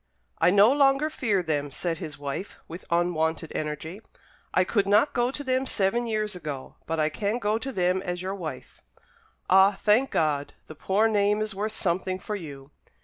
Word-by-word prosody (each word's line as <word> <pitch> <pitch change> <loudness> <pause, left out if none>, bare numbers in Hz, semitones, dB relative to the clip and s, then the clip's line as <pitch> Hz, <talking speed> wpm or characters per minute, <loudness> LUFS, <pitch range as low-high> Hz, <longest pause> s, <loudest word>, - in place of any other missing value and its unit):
"I - - +5
no 205 +6 +6
longer 280 +2 +3
fear 205 -10 0
them," 145 -3 -1
said 165 +4 -3
his 150 -3 -7
wife, 145 +7 -5
with 170 +3 -9
unwonted 165 -2 0
energy, 155 +6 -4 0.5
"I 185 - +3
could 200 +1 0
not 215 +9 +4
go 240 0 +1
to 285 +2 -5
them 260 0 0
seven 235 +4 +1
years 215 -2 -1
ago; 150 -6 -7
but 165 0 -2
I 155 0 +2
can 205 +8 -2
go 215 -1 0
to 270 +4 -4
them 185 -3 +1
as 180 -2 -4
your 190 +2 -3
wife." 160 -9 -7 0.7
"Ah, 190 +1 +5
thank 220 +6 +3
God, 145 -3 0
the - - -10
poor 195 +8 +1
name 210 -1 +2
is 215 0 -2
worth 210 +3 -3
something 185 0 -1
for 210 +3 -5
you." 145 -6 -9
190 Hz, 185 wpm, -26 LUFS, 160-215 Hz, 0.7 s, no